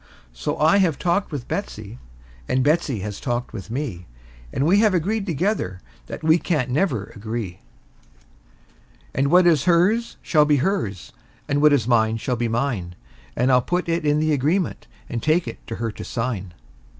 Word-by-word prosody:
And - - -30
so - - -2
I 160 +6 +4
have 180 -7 +2
talked 180 +2 0
with 140 -5 -5
Betsey, - - -5 0.5
and 130 0 +2
Betsey 145 - +1
has 105 0 -5
talked 120 -2 -3
with 100 -1 -7
me, 115 - -4 0.4
And 135 - 0
we 190 +6 +4
have 215 -3 +4
agreed 200 +5 -1
together 170 - -1 0.3
that - - -7
we 160 +2 +4
can't 140 -9 -1
never 130 - 0
agree; 110 -3 -5 1.5
And 140 +1 +1
what 180 +3 +6
is 160 -4 +4
hers 185 +7 +2
shall 150 -3 +4
be 150 0 +3
hers, 130 - -2 0.4
and 145 0 +1
what 150 0 +6
is 130 -6 +2
mine 110 -2 +3
shall 125 +2 -2
be 120 0 -1
mine; 115 -7 -2 0.4
And 125 +3 +2
I'll 125 0 +5
put 175 +7 -1
it 165 0 0
in 150 0 +2
the 155 0 +2
agreement, 155 +6 0 0.2
and 115 - -4
take 160 +5 +2
it - - -6
to 115 - -4
her 115 -1 -3
to - - -8
sign. 110 -7 -4
140 Hz, 180 wpm, -22 LUFS, 115-170 Hz, 1.5 s, what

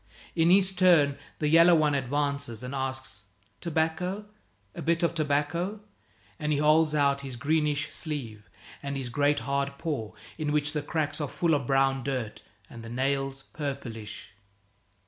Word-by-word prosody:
In 165 0 +4
his 190 +1 +5
turn 175 -7 +4 0.2
the 150 - 0
yellow 165 +3 +7
one 155 -2 +3
advances 140 -3 -1
and 125 +2 -5
asks, 130 -6 -4 0.3
"Tobacco? 170 +5 -1 0.5
A - - -7
bit 170 +1 +1
of 170 - +2
tobacco?" 160 +6 0 0.6
And 150 -1 -1
he 145 - +2
holds 155 +1 +4
out 140 -1 +2
his 135 -2 -6
greenish 150 +2 0
sleeve 120 -10 -6 0.3
and 140 -1 -3
his 130 -3 -4
great 145 +1 +2
hard 140 +2 -1
paw, 140 -11 -3 0.3
in 150 -1 -1
which 150 0 +1
the 150 - -1
cracks 150 0 -2
are 145 - -2
full 170 -2 +1
of 140 -4 0
brown 135 -1 +2
dirt, 125 -5 -3 0.3
and 120 - -10
the 115 - -9
nails 135 +2 -1
purplish. 125 -9 -6
145 Hz, 155 wpm, -28 LUFS, 135-160 Hz, 0.6 s, yellow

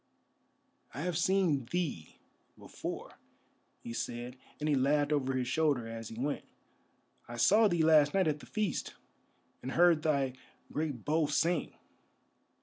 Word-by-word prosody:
"I 140 - -4
have 175 +1 -2
seen 170 -6 +2
thee 145 - -3 0.4
before," - - -7 0.6
he 115 - -6
said, 120 +1 -4 0.2
and 150 - -2
he 150 - +2
laughed 145 +2 +2
over 135 -2 0
his 130 -1 -1
shoulder 140 -4 +1
as 115 -1 -7
he 110 - -9
went; 145 +3 -2 0.8
"I 120 - -7
saw 210 - +5
thee 175 -4 +1
last 155 -2 +5
night 190 -3 +3
at 150 -1 0
the - - -13
feast, 210 -7 -2 0.7
and 130 - -5
heard 170 -2 +5
thy 140 -4 +1 0.4
great 145 -6 -3
bow 155 0 +2
sing. 170 +3 0
150 Hz, 145 wpm, -32 LUFS, 130-165 Hz, 0.8 s, saw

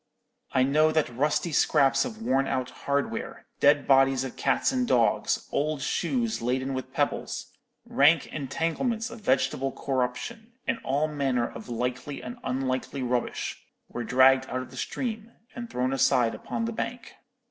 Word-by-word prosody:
I 130 - +3
know 155 +4 +4
that 155 -6 0
rusty 150 +5 +1
scraps 140 -2 +3
of 225 -2 -7
worn 135 -6 +2
out 130 -1 -2
hardware, 140 0 -3
dead 145 0 +4
bodies 135 -1 +4
of 130 - -6
cats - - +1
and 255 -2 0
dogs, 120 - +2
old 150 -1 -1
shoes 230 - -1
laden 130 +3 -1
with 130 -1 -5
pebbles, - - -2 0.3
rank 150 +2 +4
entanglements 165 - -2
of 235 -1 -10
vegetable 135 -3 +1
corruption, 135 - -3
and 260 -3 -1
all 145 +4 +1
manner 135 -5 0
of 115 +1 -10
likely 125 +4 -3
and 240 +1 -7
unlikely 130 +1 -2
rubbish, 125 -1 -2 0.3
were 120 - -4
dragged 130 +2 +4
out 130 0 -2
of - - -13
the - - -11
stream, 230 -2 -4 0.2
and 235 -1 -7
thrown 130 +1 -1
aside 125 -3 +3
upon 230 - -4
the 230 - -3
bank. 245 +3 -5
140 Hz, 155 wpm, -27 LUFS, 130-175 Hz, 0.3 s, know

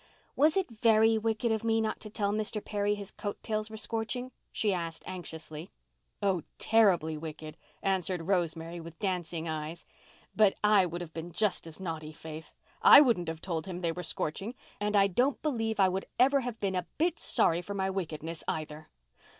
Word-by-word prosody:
"Was 305 +5 +4
it 380 -10 0
very 220 0 +5
wicked 225 +1 0
of 220 0 0
me 225 0 +2
not 220 -1 -1
to 215 - -8
tell 205 -1 -1
Mr. 210 0 -2
Perry 205 0 0
his 200 -1 -7
coat 205 -1 -5
tails 215 -1 -2
were 220 - -8
scorching?" 230 +3 -3 0.2
she 210 -3 +1
asked 165 -2 -4
anxiously. 165 -2 -7 0.5
"Oh, 190 -4 +2 0.2
terribly 190 -8 +4
wicked," 155 0 -7 0.3
answered 185 -3 0
Rosemary, 170 -2 -1
with 165 0 -10
dancing 175 -4 -2
eyes. 155 +1 -4 0.5
"But 210 -3 +5
I 210 -3 +5
would 175 +1 -5
have 165 -2 -8
been 165 +1 -6
just 185 -2 0
as 160 - -9
naughty, 160 -4 -5
Faith—I 160 - +4
wouldn't 235 - +3
have 160 0 -4
told 170 -1 -3
him 180 -1 -5
they 170 -2 +1
were 180 +2 -5
scorching—and 205 +5 -4
I 200 -1 +6
don't 250 +9 +1
believe 225 -7 -1
I 190 - +6
would 190 +1 -3
ever 275 +3 +5
have 245 -3 -4
been 195 -2 -1
a 180 -1 -2
bit 335 +1 +1
sorry 170 +1 +3
for 200 +3 -6
my 190 -1 0
wickedness, 165 -3 -4
either." 155 0 -4
190 Hz, 180 wpm, -30 LUFS, 165-220 Hz, 0.5 s, I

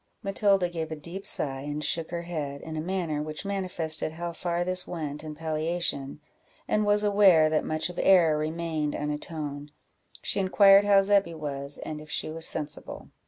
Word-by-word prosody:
Matilda 195 -2 +2
gave 165 -2 -5
a - - -2
deep 170 +6 -7
sigh 135 -2 -1
and 145 +2 -4
shook 160 +2 -1
her 170 0 -4
head, 150 -5 -4
in 160 -1 -7
a 155 - -2
manner 170 -4 -2
which 155 +4 -6
manifested 180 -6 -2
how 170 +1 -5
far 175 0 -1
this 185 0 0
went 150 -3 -5
in 155 -1 -7
palliation, 155 -2 -2 0.5
and 210 -1 +1
was 205 0 +3
aware 195 -7 +5
that 155 - +2
much 155 0 -1
of 180 - -7
error 175 -5 +5
remained 155 -1 -2
unatoned. 150 -1 -4 0.5
She 200 - -1
inquired 195 +1 +6
how 200 -1 +6
Zebby 195 -4 +2
was, 140 -2 -5
and 155 -1 -6
if 155 - -13
she - - -2
was 165 +1 +1
sensible. 150 0 -4
160 Hz, 175 wpm, -27 LUFS, 150-185 Hz, 0.5 s, inquired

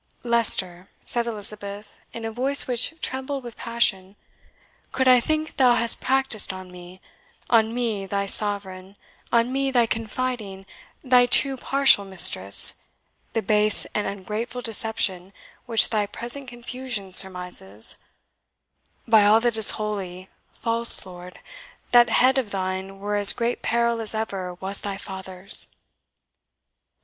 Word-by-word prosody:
"Leicester," 195 -6 +2 0.2
said 235 -1 -2
Elizabeth, 205 -1 -3
in 230 -1 -8
a 225 - -5
voice 265 +5 +2
which 250 +5 -1
trembled 265 +1 -5
with 240 -2 -10
passion, 210 -5 -2 0.8
"could 260 0 -1
I 250 -1 +6
think 310 +4 -4
thou 250 -3 +4
hast 235 -1 +3
practised 265 -6 0
on 185 -1 -11
me 180 +1 -14 0.5
on 225 -1 +3
me 225 -5 -4
thy 200 +1 -3
Sovereign 195 -2 -1 0.4
on 235 +2 +1
me 275 0 -1
thy 245 -3 +2
confiding, 225 -3 -5 0.4
thy 250 -1 +3
too 270 +2 +4
partial 270 -4 +2
mistress, 175 - +4 0.5
the 225 - -2
base 210 +1 +2
and 210 - -2
ungrateful 215 +5 -6
deception 205 -5 -1 0.3
which 230 -2 +2
thy 210 -2 -1
present 240 +6 -5
confusion 240 -5 -6
surmises 180 - +3 1.1
by 220 -2 +4
all 210 +2 +4
that 240 -1 0
is 220 -2 +8
holy, 190 -3 -6 0.2
false 230 -2 +2
lord, 180 -1 -13 0.5
that 240 -1 +5
head 260 +1 +3
of 240 -5 -5
thine 190 0 -5
were 205 +1 -5
in - - -1
as 200 - +8
great 235 0 -3
peril 235 0 -1
as 220 0 -4
ever 195 -5 -5
was 190 +2 -4
thy 200 -1 -5
father's!" 190 -2 -4
220 Hz, 135 wpm, -22 LUFS, 195-240 Hz, 1.1 s, is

